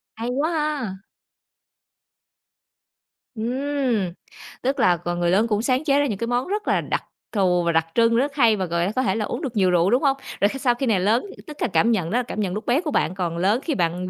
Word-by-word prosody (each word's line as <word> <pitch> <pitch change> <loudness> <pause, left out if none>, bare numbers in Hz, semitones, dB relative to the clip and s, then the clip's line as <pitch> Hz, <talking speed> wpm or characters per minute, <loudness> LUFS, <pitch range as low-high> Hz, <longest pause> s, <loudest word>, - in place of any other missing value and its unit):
Hay 230 +2 -4
quá 290 +6 0 0.3
ha. 190 -2 -6 2.3
Ừm, 245 -5 -1 0.5
tức 270 +2 -1
là 175 -5 +4
c 175 - -21
người 175 0 +1
lớn 215 +5 +3
cũng 210 -1 0
sáng 255 +4 +1
chế 285 -2 +3
ra 290 - +2
những 210 -7 -2
cái 230 +2 -3
món 245 +4 0
rất 415 +2 -3
là - - +2
đặc - - -2 0.3
thù 180 -4 +2
và 170 - +1
đặc 165 0 +1
trưng 230 0 +4
rất 275 +4 0
hay 230 -6 +4
và 190 -2 -2
gọi 170 +3 -1
có 260 - +1
thể 195 -5 +1
là 215 -2 -1
uống - - -4
được 255 -6 -4
nhiều 185 -2 +3
rượu, 175 +2 +3
đúng 250 +6 +2
hông? 275 -1 +3 0.2
Rồi 200 - +5
khi 270 - -6
sau 245 -3 +2
khi 265 - -2
này 215 -6 +2
lớn 220 - +2 0.2
tức 300 -1 -9
là - - +2
cảm 230 +3 +2
nhận 180 -7 0
đó 240 - +1
là - - -1
cảm 215 - -6
nhận 190 -3 -1
lúc 215 - -5
bé 260 +7 +2
của 305 -4 -3
bạn, 175 - 0
còn 170 -3 -2
lớn 205 +8 +2
khi 305 -5 -1
bạn 180 0 -1
225 Hz, 245 wpm, -23 LUFS, 185-260 Hz, 2.3 s, Rồi